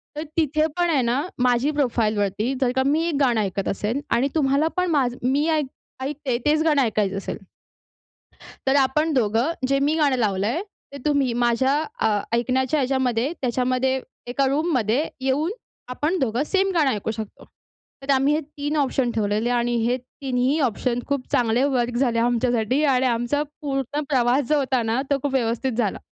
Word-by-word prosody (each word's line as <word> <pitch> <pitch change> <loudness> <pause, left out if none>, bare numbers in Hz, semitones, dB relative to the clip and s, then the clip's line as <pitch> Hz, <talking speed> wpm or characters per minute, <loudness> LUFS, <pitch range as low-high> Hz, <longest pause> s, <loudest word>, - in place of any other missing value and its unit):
तर 300 - -3
तिथे 310 0 +2
पण 350 -1 +2
आहे 295 -5 +2
ना 245 +3 +1 0.2
माझी 250 +4 +2
प्रोफाईलवरती 220 -5 0
जर 250 - +2
का 260 - +2
मी 300 +4 +2
एक 330 - -1
गाणं 245 -5 +3
ऐकत 195 -1 -2
असेल 215 +7 -2
आणि 250 +4 +2
तुम्हाला 285 +1 +2
पण 360 0 +1
माझं 255 -5 +1
मी 285 +4 +2
ऐक 305 -2 +1 0.4
ऐकते 270 -3 -2
तेच 305 +1 +3
गाणं 300 -3 +3
ऐकायचं 205 -4 0
असेल 195 - -4 1.3
तर 265 - +4
आपण 305 +4 +1
दोघं 235 +3 +1 0.2
जे 275 0 +2
मी 300 - +2
गाणं 295 -4 +2
लावलंय 215 - 0 0.3
ते - - -6
तुम्ही 280 -4 +2
माझ्या 260 +3 +2 0.3
अ, - - +2 0.3
ऐकण्याच्या 260 +5 +1
ह्याच्यामध्ये 260 0 0
त्याच्यामध्ये 255 +1 0 0.3
एका 265 +3 0
रूममध्ये 275 - +1 0.2
येऊन 275 +6 0 0.4
आपण 300 +8 -1
दोघं 250 +1 0
सेम 390 +3 +1
गाणं 310 -5 +3
ऐकू 215 0 -2
शकतो. 220 -2 -8 0.6
तर 270 - -11
आम्ही 270 +2 +3
हे 305 - +2
3 295 0 -5
ऑप्शन 265 -3 +1
ठेवलेले 215 +2 0
आणि 240 0 +1
हे 245 +2 +1
तिन्ही 255 +2 -2
ऑप्शन 245 -2 0
खूप 280 -2 -2
चांगले 240 +1 +2
वर्क 245 -4 0
झाले. 240 -3 +1
आमच्यासाठी 240 +2 +1
आणि 255 +1 +2
आमचा 240 +5 0 0.2
पूर्ण 275 0 -2
प्रवास 255 0 +2
जो 305 - +3
होता 260 -2 0
ना, 225 +3 0
तो 280 - +4
खूप 285 - -1
व्यवस्थित 240 0 0
झाला. 215 -5 0
260 Hz, 170 wpm, -23 LUFS, 235-290 Hz, 1.3 s, तर